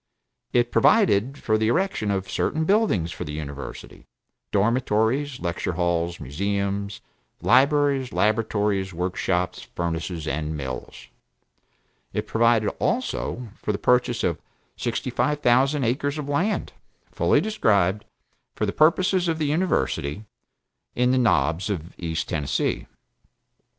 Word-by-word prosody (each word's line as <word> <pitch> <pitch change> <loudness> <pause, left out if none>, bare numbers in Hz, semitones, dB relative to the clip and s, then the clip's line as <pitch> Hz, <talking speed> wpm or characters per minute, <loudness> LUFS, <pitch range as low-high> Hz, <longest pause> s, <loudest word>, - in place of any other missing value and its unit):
It 120 0 +2
provided 135 - +3
for 110 -4 0
the 110 - +1
erection 120 - 0
of 95 -1 -1
certain 160 +10 -1
buildings 190 - +2
for 90 - -5
the 75 -3 -6
University, 70 -2 -8 0.4
dormitories, 120 +5 +1
lecture 85 -3 -2
halls, 85 -1 -1
museums, 100 +7 -2 0.4
libraries, 140 0 +3
laboratories, 105 -3 0
work 90 +2 -2
shops, 90 -1 -1
furnaces, 85 -1 -3
and 75 0 -2
mills. 65 -3 -6 1.1
It - - -2
provided 115 -2 +3
also 180 - -2
for - - -1
the 100 - -2
purchase 125 0 +2
of 85 -3 0 0.4
sixty - - -3
five 150 0 0
thousand 135 +3 +3
acres 140 +5 0
of 150 -2 -4
land, 175 +9 -1 0.4
(fully - - +3
described) 105 - +1 0.5
for - - 0
the - - -2
purposes 180 +3 +3
of 165 -1 0
the 155 - -1
University, 110 - 0 0.7
in 125 +1 +3
the 130 - +3
Knobs 90 - +2
of 85 -4 -4
East 80 -2 -3
Tennessee. 75 -3 -1
110 Hz, 125 wpm, -24 LUFS, 85-140 Hz, 1.1 s, provided